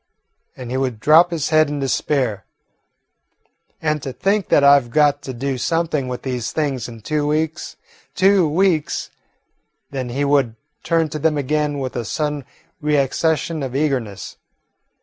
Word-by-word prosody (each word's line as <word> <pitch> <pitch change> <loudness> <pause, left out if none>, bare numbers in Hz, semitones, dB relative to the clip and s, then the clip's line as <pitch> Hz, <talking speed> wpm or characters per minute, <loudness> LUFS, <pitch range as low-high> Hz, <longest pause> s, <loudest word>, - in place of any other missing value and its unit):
and 125 -2 -7
he 130 - -1
would 130 -4 -2
drop 160 +7 +6
his 165 -4 -2
head 155 -1 +4
in 145 0 -3
despair. 130 -6 -1 1.4
"And 150 -1 -1
to 135 - -5
think 200 +7 0
that 145 - +4
I 140 0 +8
've 120 -3 -12
got 145 +2 +3
to 140 - -6
do 130 +1 -3
something 165 -3 0
with 125 -1 -5
these 125 -3 -3
things 140 -5 -2
in 115 -2 -11
two 150 +5 -1
weeks 155 +2 -2 0.4
two 190 -4 +4
weeks!" 165 -1 0 0.8
Then 130 -3 -4
he 140 +4 -1
would 140 -5 +2 0.3
turn 165 -2 +1
to 155 - -5
them 155 0 +1
again 150 +1 0
with 130 -2 -4
a 120 - -2
sudden 150 +3 -3 0.4
reaccession 150 +3 0
of 130 -1 -5
eagerness. 130 -9 -2
145 Hz, 155 wpm, -20 LUFS, 130-155 Hz, 1.4 s, I